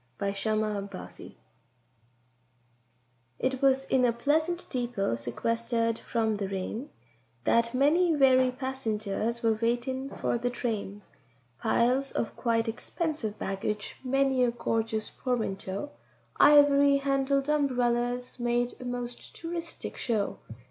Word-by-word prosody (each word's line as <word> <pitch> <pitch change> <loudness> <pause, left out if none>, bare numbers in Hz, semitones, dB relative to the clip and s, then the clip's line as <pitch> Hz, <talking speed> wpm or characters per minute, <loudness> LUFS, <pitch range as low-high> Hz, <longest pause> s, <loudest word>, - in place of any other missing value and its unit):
THE 200 0 -1
BALLAD 215 -1 +1
OF - - -11
CHARITY 90 - -10 2.0
It 260 0 -1
was 270 0 +3
in 260 -1 +2
a 245 - +4
pleasant 315 +8 0
deepô, 240 - -1
sequestered 230 - -1
from 220 -2 0
the 200 -2 -3
rain, 195 +7 -4 0.5
That 235 +1 +2
many 320 +5 +4
weary 260 -2 +5
passengers 235 -4 -2
were 225 -1 +4
waitin' 250 +3 -1
for 240 - -1
the 245 +1 0
train; 210 -5 -4 0.6
Piles 250 +4 +2
of 230 - -2
quite 230 -1 +1
expensive 235 -1 -3
baggage, 200 +2 -3
many 270 0 +2
a 245 - +4
gorgeous 225 -2 -2
portmantó, 220 -1 -3 0.5
Ivory 285 -1 +6
handled 275 0 +1
umberellas 245 -4 0
made 240 0 0
a - - -7
most 245 -1 -5
touristic 335 0 -5
show. 215 -5 -1
245 Hz, 115 wpm, -29 LUFS, 225-270 Hz, 2.0 s, Ivory